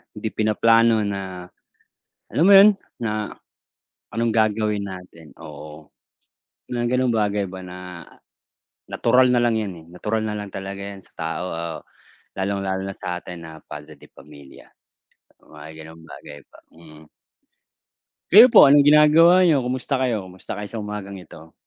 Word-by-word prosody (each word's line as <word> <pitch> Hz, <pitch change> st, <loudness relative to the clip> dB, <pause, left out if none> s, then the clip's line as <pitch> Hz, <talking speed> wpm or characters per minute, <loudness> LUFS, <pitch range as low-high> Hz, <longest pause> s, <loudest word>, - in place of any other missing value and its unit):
hindi 110 Hz, +1 st, -4 dB
pinaplano 115 Hz, +1 st, +2 dB
na 95 Hz, -3 st, -5 dB, 0.8 s
alam 160 Hz, -, -1 dB
mo -, -, +7 dB
yun, 200 Hz, +2 st, +8 dB, 0.3 s
na 110 Hz, -3 st, -3 dB, 0.9 s
anong 115 Hz, +1 st, 0 dB
gagawin 110 Hz, -2 st, 0 dB
natin 90 Hz, -4 st, -12 dB
oo. 75 Hz, 0 st, -12 dB, 0.8 s
Mga 120 Hz, 0 st, -1 dB
gano'ng 130 Hz, -1 st, +1 dB
bagay 105 Hz, -1 st, -1 dB
ba 95 Hz, -, -8 dB
na 90 Hz, 0 st, -10 dB, 1.1 s
natural 125 Hz, 0 st, +2 dB
na 120 Hz, -, +2 dB
lang 115 Hz, -2 st, +1 dB
yun, 105 Hz, -3 st, -4 dB
eh, -, -, -19 dB
natural 105 Hz, +5 st, -3 dB
nalang 105 Hz, -1 st, -7 dB
talaga 95 Hz, +1 st, -6 dB
'yan 100 Hz, 0 st, -9 dB
sa -, -, -21 dB
tao 80 Hz, +2 st, -4 dB
o 80 Hz, -, -5 dB, 0.7 s
lalong-lalo 95 Hz, -1 st, -3 dB
na 95 Hz, -, -8 dB
sa'tin 90 Hz, -1 st, -7 dB
na 80 Hz, -1 st, -12 dB
padre 75 Hz, +1 st, -11 dB
de 70 Hz, -, -19 dB
pamilya. 70 Hz, -2 st, -17 dB, 0.7 s
Mga 75 Hz, 0 st, -14 dB
gano'ng 80 Hz, +1 st, -13 dB
bagay 75 Hz, -2 st, -12 dB
ba. -, -, -21 dB, 0.2 s
Mm. 80 Hz, -2 st, -16 dB, 1.2 s
Kayo 220 Hz, +6 st, +9 dB
po 250 Hz, -, +7 dB
anong 145 Hz, 0 st, +6 dB
ginagawa 160 Hz, +4 st, +6 dB
niyo? 160 Hz, -6 st, +3 dB
Kumusta 130 Hz, +2 st, -3 dB
kayo? 120 Hz, -6 st, -1 dB
Kumusta 95 Hz, 0 st, -9 dB
kayo 105 Hz, 0 st, -6 dB
sa 115 Hz, -, -5 dB
umagang 105 Hz, -2 st, -7 dB
ito? 80 Hz, -2 st, -15 dB
100 Hz, 145 wpm, -21 LUFS, 85-115 Hz, 1.2 s, Kayo